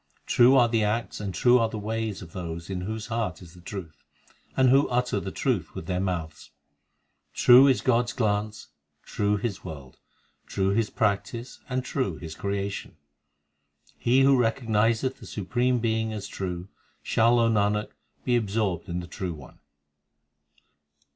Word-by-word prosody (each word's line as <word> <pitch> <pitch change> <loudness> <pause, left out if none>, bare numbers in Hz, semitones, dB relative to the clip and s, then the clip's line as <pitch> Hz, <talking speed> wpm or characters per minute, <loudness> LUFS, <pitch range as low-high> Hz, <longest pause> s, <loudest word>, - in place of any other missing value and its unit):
True 125 +3 +5
are 120 -2 +6
the 115 -2 +1
acts 110 +3 -1
and 100 -2 -4
true 120 +7 +4
the - - -4
ways 110 -1 -3
of 80 - -13
those 85 0 -6
In 90 -1 -3
whose 110 +3 -4
hearts 110 -6 -3
is 85 -2 -14
the 90 - -15
truth, 85 -5 -8 0.5
and 130 -1 +5
who 135 +2 +4
utter 125 0 0
the - - -5
truth - - -1
with - - -6
their 90 0 -1
mouths. 85 -5 -4 0.9
True 125 +3 +8
is 135 - +3
God 120 -1 +2
s 120 - -5
glance, 105 -3 -1 0.3
true 105 0 0
His 105 -2 -4
world, 70 -7 -9 0.5
True 95 -1 0
His 105 +2 +1
practice, 115 +4 -2
and 130 0 -2
true 130 0 -1
His 80 -2 -8
creation. 100 -2 -4 1.0
He 125 +3 +3
who 135 0 +6
recognizeth 115 +1 +1
the - - -11
Supreme 120 +5 0
Being 110 -1 -1
as 105 -2 -5
true, 90 -1 -5 0.3
Shall, 115 +2 +3
O 115 -1 +4
Nanak, 105 -1 +1 0.3
be 125 - +2
absorbed 100 -6 -1
in 85 +1 -2
the - - -8
True 90 -3 -5
One. 70 -4 -14
105 Hz, 160 wpm, -26 LUFS, 95-120 Hz, 1.0 s, True